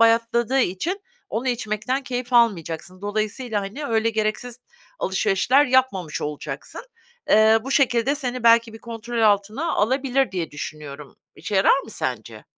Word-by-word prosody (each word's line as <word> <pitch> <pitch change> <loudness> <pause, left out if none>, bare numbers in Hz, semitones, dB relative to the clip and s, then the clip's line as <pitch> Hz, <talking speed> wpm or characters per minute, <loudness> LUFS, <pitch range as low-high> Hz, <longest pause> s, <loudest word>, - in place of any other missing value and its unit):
bayatladığı 230 +3 +3
için 310 - -1 0.3
onu 250 +4 -2
içmekten 240 +3 -2
keyif 250 -1 -5
almayacaksın. 185 -6 +1
Dolayısıyla, 215 +2 -2
hani, 220 +10 -6
öyle 225 -1 +1
gereksiz 220 +3 -3 0.4
alışverişler 210 +8 +2
yapmamış 250 -11 +1
olacaksın. 150 -1 -6 0.5
Eee, 220 +1 +6
bu 270 - -5
şekilde 265 -1 +2
seni 255 -4 -3
belki 230 -1 +5
bir 225 - -10
kontrol 235 0 -5
altına 215 +10 +1
alabilir 260 +1 +1
diye 175 -3 -3
düşünüyorum. 145 -1 -8 0.2
İşe 205 - -5
yarar 195 +7 +5
mı - - -12
sence? - - -5
230 Hz, 135 wpm, -23 LUFS, 205-255 Hz, 0.5 s, Eee